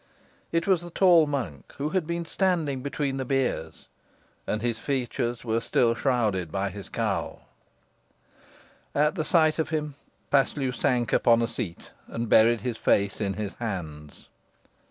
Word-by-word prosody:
It 165 0 +1
was 190 -4 +3
the 175 - -8
tall 170 -3 +5
monk, 120 - -4
who 145 +2 -1
had 180 -2 -1
been 170 0 -2
standing 165 -8 0
between 140 0 -2
the 135 - -2
biers, 130 - -2 0.6
and 110 +1 -2
his 120 -2 -1
features 120 -2 -2
were 115 0 0
still 115 0 +2
shrouded 110 - 0
by 100 0 -1
his 100 -2 -9
cowl. - - -3 1.5
At 150 +3 +2
sight 160 -1 +3
of 160 - 0
him, 150 -2 -2 0.4
Paslew 135 -1 +2
sank 125 -1 0
upon 115 0 +4
a - - +1
seat 105 -9 -6 0.2
and 115 0 -4
buried 115 +2 +5
his 120 -2 -3
face 100 +1 +1
in 100 -2 -1
his 100 -1 -4
hands. 80 -10 -6
125 Hz, 150 wpm, -26 LUFS, 110-150 Hz, 1.5 s, tall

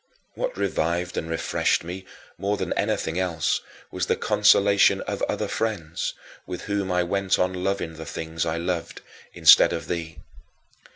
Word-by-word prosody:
What - - -3
revived 85 +2 -1
and 80 - -3
refreshed 80 0 0
me, 90 +2 -7 0.3
more 100 +1 -1
than - - -2
anything 80 +3 -1
else, 85 -5 0 0.3
was - - -2
the - - +2
consolation 100 -1 +4
of - - -4
other - - -1
friends, 95 -8 -3 0.3
with 90 - -6
whom 100 -2 -2
I 90 0 +2
went 95 +2 0
on 90 0 +1
loving 95 -2 -2
the 80 - -7
things 80 +3 -4
I 80 - -1
loved 85 0 -3 0.3
instead - - +7
of 85 - -4
thee. 80 -2 -4
90 Hz, 155 wpm, -24 LUFS, 80-100 Hz, 0.3 s, instead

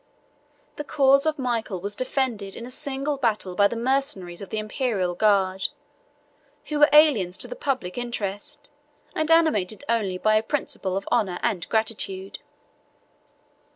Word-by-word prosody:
The 295 - -3
cause 275 0 +3
of 310 0 0
Michael 230 -7 -2
was 200 +3 -4
defended 250 -6 -1
in 235 - -7
a 250 - -7
single 275 +2 -2
battle 215 -7 0
by 200 +2 +4
the 235 - -5
mercenaries 235 -8 -1
of 195 - -8
the 220 - -3
Imperial 215 -4 -1
guard, 190 -1 +2 1.0
who 300 -1 -1
were 295 - +7
aliens 270 - +5
to - - +1
the - - -7
public 260 - -2
interest, 240 +5 -5 0.4
and 310 0 -1
animated 300 - +3
only 210 -6 0
by 215 +3 +3
a - - +2
principle 220 -7 -3
of 195 - -5
honor 185 -4 +1
and 180 -5 -1
gratitude. 205 -4 -2
220 Hz, 150 wpm, -24 LUFS, 195-275 Hz, 1.0 s, were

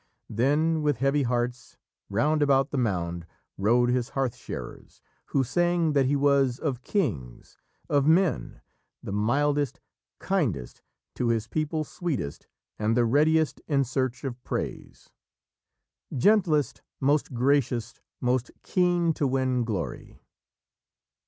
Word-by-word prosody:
Then 150 +8 +2
with 145 -4 +1
heavy 135 +3 +2
hearts, 125 0 -2 0.3
"round 150 +10 +1
about 135 -1 +3
the 145 - -2
mound 85 -6 -2 0.3
rode 120 +5 +3
his 125 0 0
hearth 135 -3 -1
sharers, - - -9 0.3
who 135 - +1
sang 175 +2 +1
that 135 -2 +3
he 145 - +2
was 140 -3 +3
of 135 -5 -3
kings, 105 - -3 0.3
of 145 0 +2
men, 165 - +2 0.4
the - - -5
mildest, 140 +6 +1 0.4
kindest, 120 - -2 0.3
to 125 - -1
his 115 -1 0
people 155 +3 -1
sweetest, 145 - -4 0.3
and 110 +2 +1
the 120 - +4
readiest 155 +5 +2
in 140 -3 +2
search 130 -1 -2
of 125 -2 -5
praise": - - -5 1.1
"Gentlest, 165 - +2 0.2
most 140 -1 +1
gracious, 125 -2 +1 0.3
most 125 0 0
keen 175 -2 +2
to 145 - 0
win 130 -1 +1
glory." 110 -4 -5
135 Hz, 120 wpm, -27 LUFS, 120-150 Hz, 1.1 s, the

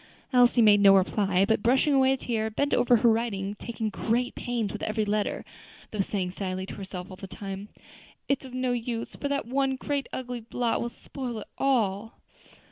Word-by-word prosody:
Elsie 245 -1 +5
made 205 -1 +7
no 200 -1 +7
reply, 195 0 +2
but, 220 0 +1
brushing 260 +5 +3
away 265 -1 +4
a - - -1
tear, 225 -3 -2
bent 285 +7 -1
over 245 0 +4
her 235 +1 +4
writing, 205 -4 -1
taking 225 -2 -3
great 240 +4 0
pains 235 -5 -2
with 210 - -6
every 215 0 -1
letter, 210 0 -1 0.5
though 210 - -6
saying 190 -2 -1
sadly 185 -1 -3
to - - -8
herself 190 -1 -7
all - - -7
the 195 - -8
time, 195 +1 -7 0.6
"It's 275 -1 0
of 260 - -10
no 255 -1 0
use, 235 -1 -3
for 285 - -3
that 280 -4 -2 0.3
great 285 0 -2
ugly 250 -1 -4
blot 235 +1 -1
will 235 - -2
spoil 245 0 -6
it 215 - -7
all." 225 -5 +1
225 Hz, 190 wpm, -27 LUFS, 200-245 Hz, 0.6 s, made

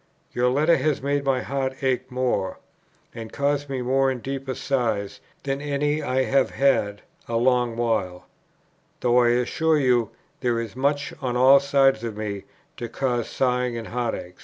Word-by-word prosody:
Your 125 +1 +1
letter 155 +6 +3
has 145 +1 0
made 140 0 0
my 135 -2 +1
heart 135 -1 -3
ache 130 -1 0
more, 125 -7 -1 0.6
and 115 -1 -8
caused 145 0 -1
me 130 -2 -3
more 135 +2 +2
and 130 -1 -2
deeper 135 +1 -4
sighs 110 -7 -2 0.2
than 135 0 -2
any 145 +1 -1
I 130 -2 0
have 135 0 +2
had 105 -7 +1 0.2
a 115 - -3
long 120 -1 +2
while, 100 -7 -1 0.8
though 125 0 +4
I 120 -1 +4
assure 150 +7 +2
you 125 -5 +2 0.3
there 120 -2 0
is 115 -2 -6
much 140 +2 0
on 125 -2 -1
all 135 +2 +7
sides 135 -4 +2
of 110 -3 -5
me 100 -2 -4 0.3
to 120 - -5
cause 120 -2 -1
sighing 125 -2 0
and 115 -2 -6
heartache. 115 -7 -4
130 Hz, 165 wpm, -24 LUFS, 115-135 Hz, 0.8 s, all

